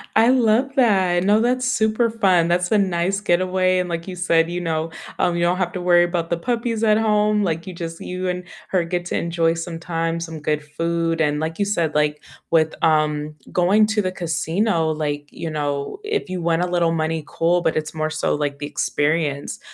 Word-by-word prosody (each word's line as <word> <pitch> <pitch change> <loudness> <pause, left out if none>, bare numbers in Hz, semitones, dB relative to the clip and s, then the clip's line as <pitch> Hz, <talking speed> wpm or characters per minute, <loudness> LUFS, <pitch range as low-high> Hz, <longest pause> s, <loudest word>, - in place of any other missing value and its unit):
I 225 +1 +5
love 255 +1 +2
that, 190 -9 +3
no, 205 +3 +4
that's 250 +2 +1
super 230 -1 +1
fun, 185 -7 +2
that's 175 0 +1
a 215 - +4
nice 190 0 0
getaway, 185 0 +2
and, 180 - -1
like 170 +1 -4
you 180 - -7
said, 165 -2 +2
you 175 - -2
know, 165 -1 -2 0.3
um, 175 -1 +1
you 170 - 0
don't 175 +1 +2
have 180 -2 -1
to 180 - -4
worry 175 -1 +5
about 170 -1 -2
the 170 - +1
puppies 230 +2 -2
at 215 -1 +4
home, 210 -1 +2
like, 165 -2 -2
you 185 - -7
just 165 -1 -7
you 185 +1 -4
and 180 0 -2 0.3
her 185 -2 +1
get 175 +1 -3
to - - -3
enjoy 165 -1 +1
some 165 0 -5
time, 165 0 -2
some 165 -2 -6
good 150 0 -1
food, 165 +1 -1
and, 150 -1 +1
like 160 +3 -4
you 205 - +2
said, 170 -7 -1
like, 150 0 +1 0.3
with, 160 -1 +2
um, 150 -1 +1 0.2
going 195 +4 +4
to 215 0 +1
the 185 -2 -2
casino, 170 +1 0
like, 145 -1 -3
you 165 - -5
know, 145 - -3
if 425 - -2
you 185 -1 -3
win 165 -1 +1
a 180 - 0
little 175 -2 +1
money, 160 -1 -1
cool, 175 +3 +1
but 160 - 0
it's 155 -1 -3
more, 155 -1 -2
so, 155 0 -1
like, 145 -1 -3
the 145 - -4
experience, 145 -1 -1
175 Hz, 215 wpm, -21 LUFS, 160-190 Hz, 0.3 s, I